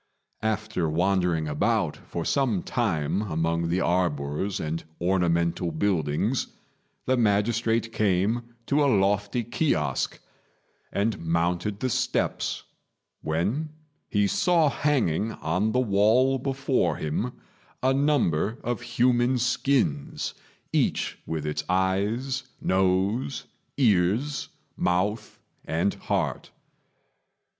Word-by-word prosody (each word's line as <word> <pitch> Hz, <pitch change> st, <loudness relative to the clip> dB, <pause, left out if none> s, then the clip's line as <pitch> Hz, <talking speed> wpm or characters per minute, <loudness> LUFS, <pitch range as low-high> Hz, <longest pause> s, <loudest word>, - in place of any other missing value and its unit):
After 110 Hz, -5 st, -1 dB
wandering 90 Hz, -1 st, +1 dB
about 75 Hz, 0 st, +1 dB
for 85 Hz, -1 st, -6 dB
some 125 Hz, -10 st, +1 dB
time 95 Hz, -, 0 dB
among 85 Hz, -3 st, -1 dB
the 90 Hz, +2 st, +1 dB
arbours 85 Hz, +1 st, 0 dB
and 80 Hz, +1 st, -3 dB, 0.2 s
ornamental 85 Hz, -1 st, +1 dB
buildings, 90 Hz, -, 0 dB, 0.6 s
the 130 Hz, -, +2 dB
magistrate 115 Hz, +1 st, +1 dB
came 110 Hz, +4 st, 0 dB
to 145 Hz, +1 st, +2 dB
a 140 Hz, -, +4 dB
lofty 105 Hz, +3 st, +1 dB
kiosque, 105 Hz, -, 0 dB, 0.7 s
and 105 Hz, +2 st, 0 dB
mounted 85 Hz, +4 st, 0 dB
the 130 Hz, -, 0 dB
steps, -, -, -1 dB, 0.6 s
when 100 Hz, -, -1 dB, 0.4 s
he 105 Hz, -1 st, +2 dB
saw 170 Hz, -, +3 dB
hanging 115 Hz, -, +1 dB
on 90 Hz, +7 st, 0 dB
the 125 Hz, -, +2 dB
wall 120 Hz, +4 st, +3 dB
before 135 Hz, -, 0 dB
him 90 Hz, +11 st, -2 dB, 0.5 s
a 130 Hz, +1 st, +4 dB
number 125 Hz, -, +1 dB
of 120 Hz, 0 st, -2 dB
human 120 Hz, +1 st, +2 dB
skins, 120 Hz, -, 0 dB, 0.4 s
each -, -, 0 dB
with 80 Hz, -2 st, -3 dB
its 75 Hz, 0 st, -2 dB
eyes, 100 Hz, +8 st, 0 dB, 0.2 s
nose, 95 Hz, +8 st, +1 dB, 0.3 s
ears, 115 Hz, +4 st, +2 dB, 0.3 s
mouth, 100 Hz, +5 st, -1 dB, 0.3 s
and 85 Hz, +5 st, 0 dB
heart. -, -, -2 dB
100 Hz, 100 wpm, -26 LUFS, 85-120 Hz, 0.7 s, a